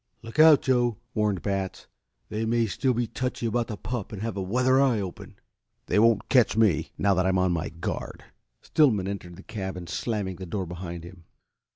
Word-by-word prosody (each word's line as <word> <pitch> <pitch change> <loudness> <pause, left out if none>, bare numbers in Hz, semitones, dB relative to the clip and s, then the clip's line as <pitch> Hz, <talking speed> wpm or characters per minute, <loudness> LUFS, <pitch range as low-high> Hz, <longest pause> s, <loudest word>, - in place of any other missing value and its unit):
"Look 115 +6 -7
out, 155 -2 +8
Joe!" 120 -4 +2 0.2
warned 105 -4 0
Batts. 95 -2 -3 0.4
"They 110 +1 -2
may 115 +1 +2
still 125 +4 0
be 120 +1 +1
touchy 125 +2 -3
about 115 +1 0
the 105 - -5
pup 110 -1 -5
and 105 -1 -6
have 115 -3 -3
a 100 - -2
weather 125 +7 +3
eye 130 -5 +3
open." 95 -3 -7 0.5
"They - - +2
won't 115 0 +3
catch 120 -4 +3
me, 90 -8 +3
now 100 0 +3
that 95 0 +1
I'm 95 0 +2
on 90 -1 +2
my 85 0 -1
guard." 85 - -5 0.4
Stillman 110 -12 +3
entered 95 -3 -6
the 95 - -13
cabin, 95 -5 -5
slamming 95 +1 -3
the 95 - -7
door 95 +2 -3
behind 85 -1 -7
him. 85 -1 -13
105 Hz, 195 wpm, -26 LUFS, 95-115 Hz, 0.5 s, out